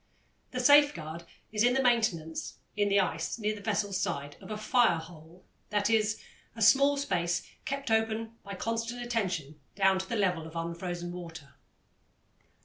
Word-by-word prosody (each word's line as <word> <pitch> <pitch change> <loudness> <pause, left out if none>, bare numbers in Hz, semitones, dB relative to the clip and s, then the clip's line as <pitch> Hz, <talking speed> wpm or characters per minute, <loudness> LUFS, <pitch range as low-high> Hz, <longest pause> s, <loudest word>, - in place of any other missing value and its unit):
The 255 - -4
safeguard 245 - +4 0.3
is 210 -1 -1
the 245 +3 +4
maintenance, 220 -11 0 0.2
in 205 -1 +2
the 200 0 +4
ice 170 -1 -1
near 215 -1 -1
the 210 - -9
vessel's 200 -2 -1
side, 140 +1 -3
of - - -11
a 215 - -3
"fire 215 -3 +3
hole," 160 +1 -12 0.2
that 210 +1 +1
is, 215 -1 +2 0.4
a 225 - -8
small 280 +6 +6
space 175 -11 -1 0.2
kept 275 -3 -3
open 225 0 +1
by 200 -1 -7
constant 230 +4 -3
attention 180 - -2 0.2
down 195 -1 +3
to 190 - -6
the 235 - -1
level 180 -6 0
of 160 - -12
unfrozen 175 +1 -4
water. 165 -5 -9
200 Hz, 155 wpm, -30 LUFS, 170-230 Hz, 0.4 s, small